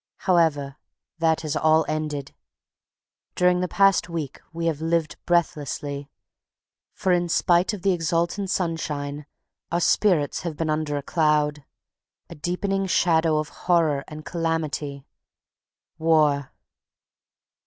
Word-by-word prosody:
However, 155 Hz, -6 st, +2 dB, 0.4 s
that 160 Hz, -1 st, +1 dB
is 150 Hz, -, -2 dB
all 155 Hz, 0 st, +3 dB
ended. 150 Hz, -3 st, -3 dB, 1.0 s
During 180 Hz, 0 st, +3 dB
the 180 Hz, -, 0 dB
past 195 Hz, -1 st, +3 dB
week 160 Hz, -5 st, -5 dB
we 165 Hz, 0 st, -4 dB
have 160 Hz, -2 st, -1 dB
lived 165 Hz, -1 st, 0 dB
breathlessly. 145 Hz, -4 st, -1 dB, 0.8 s
For 190 Hz, -, -1 dB
in 175 Hz, -1 st, +2 dB
spite 175 Hz, +3 st, +3 dB
of 205 Hz, -4 st, -7 dB
the 195 Hz, -, +3 dB
exultant 175 Hz, +3 st, -1 dB
sunshine 150 Hz, -5 st, -3 dB, 0.4 s
our 170 Hz, -, +1 dB
spirits 175 Hz, -5 st, +2 dB
have 165 Hz, -4 st, -5 dB
been 155 Hz, -1 st, -1 dB
under 155 Hz, -1 st, -1 dB
a 140 Hz, -, -4 dB
cloud, 150 Hz, -2 st, +1 dB, 0.7 s
a -, -, -5 dB
deepening 195 Hz, +5 st, -2 dB
shadow 165 Hz, -3 st, +3 dB
of 155 Hz, 0 st, -2 dB
horror 160 Hz, -6 st, +1 dB
and 155 Hz, 0 st, -9 dB
calamity.... 155 Hz, -4 st, -2 dB, 0.9 s
WAR. 150 Hz, -4 st, +2 dB
160 Hz, 120 wpm, -24 LUFS, 150-175 Hz, 1.0 s, all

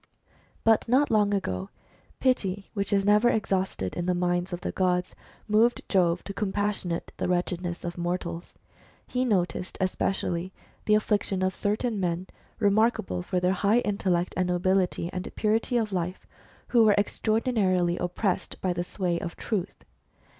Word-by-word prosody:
But 225 Hz, 0 st, +4 dB
not 270 Hz, +3 st, +3 dB
long 210 Hz, -2 st, +3 dB
ago, 95 Hz, -, -2 dB, 0.5 s
pity, 200 Hz, -7 st, 0 dB
which 200 Hz, -3 st, -2 dB
is 200 Hz, -1 st, +2 dB
never 210 Hz, +3 st, +5 dB
exhausted 190 Hz, -, -1 dB
in 175 Hz, -, -3 dB
the 180 Hz, -, +2 dB
minds 175 Hz, +1 st, 0 dB
of 175 Hz, 0 st, -4 dB
the -, -, -3 dB
gods, 180 Hz, -1 st, 0 dB, 0.3 s
moved 225 Hz, +3 st, +3 dB
Jove 175 Hz, -3 st, +2 dB
to 200 Hz, -, -6 dB
compassionate 205 Hz, -4 st, -2 dB
the -, -, -1 dB
wretchedness 175 Hz, -1 st, -1 dB
of 175 Hz, 0 st, -5 dB
mortals. 175 Hz, -1 st, -4 dB, 0.5 s
He 250 Hz, 0 st, -1 dB
noticed 185 Hz, -5 st, -1 dB
especially 185 Hz, -1 st, -1 dB, 0.3 s
the 210 Hz, -, +4 dB
affliction 205 Hz, -3 st, 0 dB
of 185 Hz, 0 st, +1 dB
certain 210 Hz, +2 st, -1 dB
men, 175 Hz, 0 st, -1 dB, 0.3 s
remarkable 205 Hz, -, +2 dB
for 180 Hz, -, -1 dB
their 180 Hz, +1 st, +2 dB
high 205 Hz, +5 st, +3 dB
intellect, 185 Hz, -5 st, 0 dB
and 185 Hz, -1 st, +1 dB
nobility, 180 Hz, -1 st, +1 dB
and 185 Hz, 0 st, -4 dB
purity 225 Hz, +3 st, +1 dB
of 215 Hz, -3 st, -1 dB
life, 180 Hz, 0 st, -3 dB, 0.4 s
who 235 Hz, -2 st, +5 dB
were 210 Hz, -2 st, +5 dB
extra 215 Hz, +1 st, 0 dB
ordinarily 185 Hz, -8 st, +1 dB
oppressed 180 Hz, +2 st, -2 dB
by 185 Hz, -1 st, 0 dB
the 175 Hz, 0 st, -2 dB
sway 175 Hz, -2 st, -1 dB
of 170 Hz, -, -5 dB
Truth. 200 Hz, -5 st, -4 dB
190 Hz, 155 wpm, -27 LUFS, 175-210 Hz, 0.5 s, never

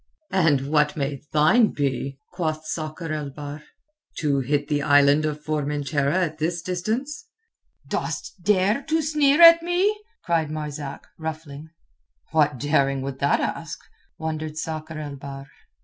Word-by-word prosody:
"And 150 Hz, -8 st, +2 dB
what 150 Hz, 0 st, +2 dB
may 140 Hz, -1 st, -2 dB
thine 155 Hz, +10 st, +5 dB
be?" 135 Hz, -1 st, -2 dB, 0.2 s
quoth 155 Hz, -3 st, -2 dB
Sakr 155 Hz, +1 st, -4 dB
el 150 Hz, -2 st, -3 dB
Bahr. 145 Hz, +1 st, -8 dB, 0.6 s
"To 145 Hz, -3 st, +1 dB
hit 145 Hz, +2 st, 0 dB
the 145 Hz, -1 st, 0 dB
Island 145 Hz, +1 st, +4 dB
of 150 Hz, 0 st, -5 dB
Formentera 145 Hz, -1 st, -1 dB
at 155 Hz, -1 st, -7 dB
this 165 Hz, +1 st, -1 dB
distance?" 230 Hz, -, -3 dB, 0.6 s
"Dost 190 Hz, -, -4 dB
dare 205 Hz, +5 st, +2 dB
to 320 Hz, 0 st, +2 dB
sneer 300 Hz, +1 st, +4 dB
at 335 Hz, 0 st, +10 dB
me?" 355 Hz, +5 st, +1 dB, 0.3 s
cried 165 Hz, -3 st, +1 dB
Marzak, 150 Hz, -2 st, -6 dB
ruffling. 155 Hz, -1 st, -6 dB, 0.6 s
"What 150 Hz, -3 st, +2 dB
daring 140 Hz, -1 st, +1 dB
would 135 Hz, -1 st, -5 dB
that 140 Hz, -, +2 dB
ask?" -, -, -3 dB, 0.4 s
wondered 155 Hz, -1 st, -4 dB
Sakr 155 Hz, 0 st, -5 dB
el 145 Hz, -2 st, -6 dB
Bahr. 135 Hz, 0 st, -8 dB
155 Hz, 135 wpm, -24 LUFS, 145-170 Hz, 0.6 s, at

